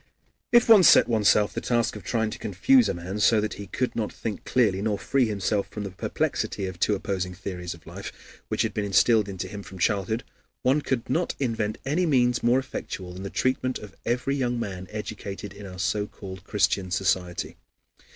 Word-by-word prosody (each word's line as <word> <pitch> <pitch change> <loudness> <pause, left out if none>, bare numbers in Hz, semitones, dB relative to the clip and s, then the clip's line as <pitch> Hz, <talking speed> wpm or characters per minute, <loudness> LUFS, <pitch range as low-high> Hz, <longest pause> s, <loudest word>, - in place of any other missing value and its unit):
If 240 -1 +6
one 220 -4 +9
set 175 - +7
oneself 105 -2 +3
the - - -3
task 120 -2 0
of 105 - -8
trying 110 +3 0
to - - -7
confuse 225 - +3
a - - -1
man 90 +4 -5
so 110 +2 +5
that 105 0 -1
he 100 - -8
could 125 +6 -2
not 110 -2 -1
think 110 -3 -5
clearly 105 -7 +2
nor 105 -1 0
free 130 +3 +1
himself 100 -1 -1
from 105 - -6
the 100 - -5
perplexity 95 +1 -2
of 95 -2 -6
two 105 - +2
opposing 95 -2 -3
theories 90 -2 -5
of 85 - -19
life - - -10
which - - 0
had - - -2
been 105 - -1
instilled 105 +1 +3
into 95 -1 -4
him 100 +1 -7
from 95 -1 -11
childhood, 105 +5 0 0.4
one 135 +4 +3
could 130 -5 -2
not 165 +8 0
invent 115 -4 -1
any 165 +6 +1
means 125 -4 +3
more 120 +2 +4
effectual 95 -8 -5
than 90 - -8
the 100 - -5
treatment 130 +2 0
of 105 -2 -11
every 125 +3 0
young 125 -3 -1
man 95 -5 -5
educated 105 -2 -6
in 100 0 -9
our 90 -1 -9
so 95 +2 0
called 95 -3 -9
Christian 95 -2 +1
society. 90 -2 -1
105 Hz, 200 wpm, -26 LUFS, 95-120 Hz, 0.4 s, one